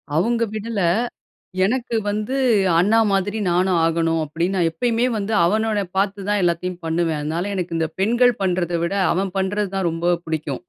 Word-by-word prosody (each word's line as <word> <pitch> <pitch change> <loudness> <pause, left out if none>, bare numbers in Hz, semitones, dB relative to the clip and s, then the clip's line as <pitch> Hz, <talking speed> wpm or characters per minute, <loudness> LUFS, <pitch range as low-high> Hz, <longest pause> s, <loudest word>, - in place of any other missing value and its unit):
அவுங்க 230 +7 +1
விடல! 220 0 -3 0.9
எனக்கு 240 +1 -1
வந்து 210 +5 -2 0.4
அண்ணா 210 +6 +4
மாதிரி 195 +2 0
நானு 180 +2 +2
ஆகனும். 165 0 +1
அப்படின்னு 170 +6 -2
நான் 170 -2 +2
எப்பயுமே 235 +7 0
வந்து 210 +1 -2
அவன 215 +2 +1
பார்த்து 195 0 -1
தான் 205 -1 +1
எல்லாத்துயும் 175 +1 -1
பண்ணுவேன். 165 -1 0
அதனால 170 +6 -2
எனக்கு 175 -2 -3
இந்த 160 -1 -1
பெண்கள், 240 +4 +3
பண்றத 175 -2 0
விட 170 +3 -1 0.2
அவன் 190 +1 -2
பண்றதான் 195 -1 -1
ரொம்ப 170 +2 0
பிடிக்கும் 155 -4 -3
190 Hz, 150 wpm, -21 LUFS, 170-210 Hz, 0.9 s, அண்ணா